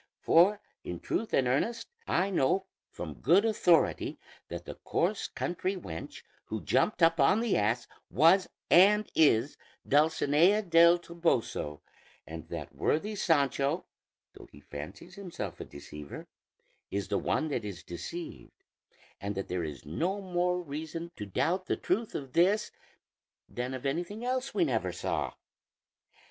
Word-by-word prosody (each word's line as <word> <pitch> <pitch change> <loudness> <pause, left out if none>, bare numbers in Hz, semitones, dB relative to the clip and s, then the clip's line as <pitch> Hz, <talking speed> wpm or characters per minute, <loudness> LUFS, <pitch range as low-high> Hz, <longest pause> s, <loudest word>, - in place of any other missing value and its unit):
For 190 +5 +5 0.2
in 90 -1 -5
truth 225 - -2
and 130 - +2
earnest, 230 - 0 0.2
I 190 +3 +1
know 185 +4 +2 0.2
from 80 -4 -8
good 175 - +5
authority 180 -6 +2 0.3
that - - -7
the - - -6
coarse - - -1
country 185 +2 -2
wench 85 - -8 0.2
who 110 -1 -4
jumped 165 +7 +1
up 165 0 +5
on 145 +10 +5
the 230 -3 +1
ass 110 +4 +1 0.2
was 170 +6 +4 0.2
and 210 +4 +6
is 145 -4 +3 0.3
Dulcinea 160 +6 +4
del 170 -1 +6
Toboso, 165 - -1 0.4
and 80 -1 -8
that - - -6
worthy 205 +8 0
Sancho, 145 -4 +1 0.5
though - - -13
he - - -14
fancies 75 - -9
himself 175 - -6
the - - -7
deceiver, 70 +1 -9 0.6
is 100 -1 -3
the - - +1
one 155 - 0
that 140 - -2
is 100 -4 -7
deceived; 85 - -8 0.6
and 100 0 -4
that 95 - -4
there 90 -1 -1
is 75 -5 -7
no 175 - -1
more 180 -1 0
reason 160 +1 -6
to 105 - -6
doubt 180 - 0
the - - 0
truth 215 +5 -1
of 135 -3 -5
this, 200 +5 +3 0.8
than 125 +2 -4
of 130 - -8
anything 175 - -2
else 255 +1 -1
we 365 - +2
never - - 0
saw. - - -2
165 Hz, 145 wpm, -30 LUFS, 120-185 Hz, 0.8 s, and